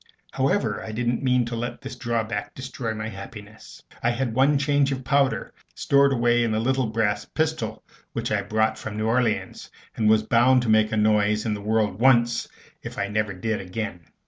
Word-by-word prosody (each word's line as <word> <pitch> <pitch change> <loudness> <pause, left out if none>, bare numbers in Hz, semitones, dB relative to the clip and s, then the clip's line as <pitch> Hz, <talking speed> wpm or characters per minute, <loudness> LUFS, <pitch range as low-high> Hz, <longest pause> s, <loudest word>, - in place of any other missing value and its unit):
However, - - 0
I 110 - -6
didn't 120 +2 -1
mean 125 -2 +2
to 120 0 -4
let 120 +1 -4
this 135 -1 -7
drawback 115 -4 -3
destroy 130 -4 -5
my 110 0 -4
happiness. 105 +1 -11 0.2
I 120 - +2
had 120 0 -1
one 135 +4 +3
charge 140 0 +2
of 130 -1 -3
powder 135 +1 +1 0.2
stowed 140 0 +3
away 120 -1 +2
in 115 - 0
the 110 - 0
little 130 +1 +1
brass 110 -2 0
pistol 155 -9 -2 0.3
which - - -3
I - - +1
brought 110 0 0
from 110 -1 -6
New 110 - -1
Orleans, 115 -1 -1 0.3
and 110 -2 +2
was 110 0 +4
bound 120 +3 +4
to 115 - -2
make 110 0 +4
a 110 - 0
noise 105 0 +2
in 110 - 0
the 105 - -5
world 105 -2 0
once, 120 -2 +3 0.3
if - - -8
I 100 - -2
never 105 -1 -1
did 110 +3 -2
again. 95 0 -5
115 Hz, 195 wpm, -24 LUFS, 110-125 Hz, 0.3 s, was